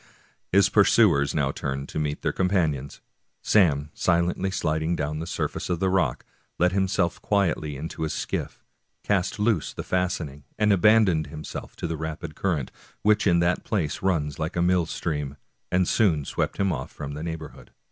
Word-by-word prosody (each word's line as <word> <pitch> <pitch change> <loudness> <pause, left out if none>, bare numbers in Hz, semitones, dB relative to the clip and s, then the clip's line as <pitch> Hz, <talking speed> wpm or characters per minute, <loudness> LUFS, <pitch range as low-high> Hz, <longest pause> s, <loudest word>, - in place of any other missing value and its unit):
His 100 0 +5
pursuers 70 0 +4
now 70 -3 +1
turned 70 0 -4
to - - -3
meet 75 -1 -2
their - - +1
companions. 80 -8 0 0.4
Sam, 75 -8 +3
sliding 90 +2 +1
silently 80 -2 0
down 75 0 -2
the 80 - -5
surface - - -3
of 90 -2 0
the 95 0 +1
rock, 85 -10 0 0.3
let 90 +1 +3
himself 95 -2 0
quietly 85 -7 0
into 80 +4 -6
his 80 -1 -1
skiff, - - -4 0.4
cast 95 -3 0
loose 105 - +1
the - - -5
fastening, 85 -6 -2
and 105 -1 +4
abandoned 100 -6 +4
himself 75 +1 -8
to - - -5
the 80 -1 -2
rapid 80 0 -5
current, 80 -7 -1 0.3
which 105 0 +3
in 85 -2 +4
that 85 +1 +1
place 85 -9 -2
runs 80 -6 0
like 80 +2 -3
a 85 - +1
mill 90 -2 +2
stream, 75 -4 -3 0.3
and 90 -1 +2
soon 80 -10 +2
swept - - -2
him 100 -1 +1
off - - -5
from 70 0 -6
the 75 - -6
neighborhood. 80 -1 -7
85 Hz, 170 wpm, -25 LUFS, 75-95 Hz, 0.4 s, His